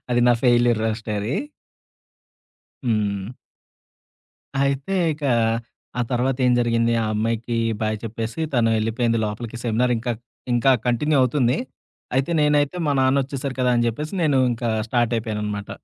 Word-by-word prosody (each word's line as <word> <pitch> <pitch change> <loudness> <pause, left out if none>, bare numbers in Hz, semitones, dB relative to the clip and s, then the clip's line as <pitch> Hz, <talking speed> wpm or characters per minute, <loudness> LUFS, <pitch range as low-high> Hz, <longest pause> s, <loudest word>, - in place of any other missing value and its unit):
అది 120 0 +3
నా - - +6
failure 120 -2 +4
love 110 -1 0
story. 105 +3 -2 1.5
హ్మ్. 105 -1 -1 1.3
అయితే, 140 +7 -1 0.2
ఇకా 145 -3 -2 0.7
ఆ - - +2
తర్వాతేం 125 0 +2
జరిగిందీ, 115 0 +2
ఆ - - -1
అమ్మాయికీ 115 +2 -1 0.3
బాయ్ 110 0 0
చెప్పేసీ 115 +5 -4
తను 115 -2 +3
ఎళ్ళిపోయింది 115 +1 0
లోపలికి. 110 +2 -5
సెమినారింకా, 120 +1 +1 0.4
ఇంకా 130 +3 +4
కంటిన్యూ 140 +5 +2
అవుతుంది. 125 -1 +2 0.6
అయితే, 135 +5 +1
నేనైతే 150 +2 +2
మా 145 - +2
నాన్నొచ్చేసారు 135 0 0
కదా! 125 0 +3
అని 120 - +2
జెప్పేసి, 150 - -4
నేనూ 140 -4 +3
ఇంకా 115 0 -3 0.2
స్టార్టయిపోయాననమాట. 110 -4 -1
120 Hz, 120 wpm, -22 LUFS, 115-135 Hz, 1.5 s, నా